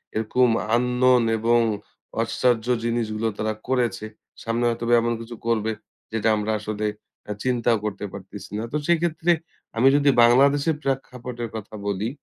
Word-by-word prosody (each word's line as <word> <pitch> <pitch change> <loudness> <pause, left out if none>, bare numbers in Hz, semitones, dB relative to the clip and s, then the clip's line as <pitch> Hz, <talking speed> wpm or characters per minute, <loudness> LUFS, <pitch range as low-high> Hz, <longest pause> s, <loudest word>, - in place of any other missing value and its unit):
এরকম 120 +3 +2 0.3
unknown 125 0 +3
এবং 120 +2 +3 0.6
আশ্চর্য 120 0 +1
জিনিসগুলো 115 -2 -1
তারা 110 0 -1
করেছে। 120 -5 0 0.4
সামনে 115 +1 -1
হয়তো 115 0 -3 0.2
এমন 120 0 0
কিছু 120 +1 -8
করবে, 110 -1 +1 0.4
যেটা 110 0 +1
আমরা 105 +1 -1
আসলে 105 0 -4 0.4
এ্যাঁ 105 -1 -5
চিন্তাও 120 -2 +2
করতে 105 0 -3
পারতেছি 100 +1 -10
না। 110 - -3
তো 150 - 0
সেক্ষেত্রে 170 0 +2 0.5
আমি 130 +3 +5
যদি 145 0 +4
বাংলাদেশে 140 +6 +4
প্রেক্ষাপটের 125 -3 -4
কথা 110 0 -7
বলি, 100 +3 -1
120 Hz, 135 wpm, -24 LUFS, 110-125 Hz, 0.6 s, আমি